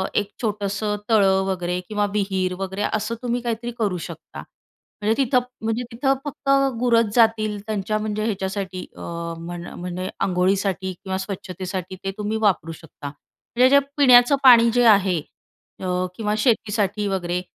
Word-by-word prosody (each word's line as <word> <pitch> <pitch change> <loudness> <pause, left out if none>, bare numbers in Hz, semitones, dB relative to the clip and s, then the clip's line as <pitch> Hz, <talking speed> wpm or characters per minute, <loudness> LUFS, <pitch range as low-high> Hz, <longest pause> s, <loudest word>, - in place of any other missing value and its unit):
एक 205 -1 +1
छोटंसं 210 -1 -1
तळं 195 -4 +4
वगैरे 180 -2 -2
किंवा 210 -1 0
विहीर 190 -3 0
वगैरे, 195 +1 -4
असं 215 +2 -1
तुम्ही 245 -1 -1
काहीतरी 235 0 -3
करू 200 -5 0
शकता. - - -9 0.6
म्हणजे 215 +2 +2
तिथं, 255 -1 +3 0.3
म्हणजे 225 +2 -1
तिथं 270 +4 +1
फक्त 285 -1 -5 0.3
गुरच 230 -3 +2
जातील 220 -3 +3
त्यांच्या 215 0 -1
म्हणजे 215 0 -2
ह्याच्यासाठी 190 -3 -3 0.2
अ, - - -10 0.4
म्हण 175 +1 -7
म्हणजे 180 +1 -4
अंघोळीसाठी 190 0 0
किंवा 190 +1 -5
स्वच्छतेसाठी 185 -1 -5
ते 195 - -2
तुम्ही 210 +1 -2
वापरू 190 -6 +1
शकता. 160 -3 -10
म्हणजे 240 - -1
जे - - +8 0.2
पिण्याचं 250 -1 +7
पाणी 235 -3 +8
जे 245 0 +3
आहे 190 -3 0 0.6
अ, 180 -1 -1
किंवा 210 0 -1
शेतीसाठी 210 -3 +1
वगैरे 180 -2 -1
205 Hz, 145 wpm, -22 LUFS, 185-225 Hz, 0.6 s, जे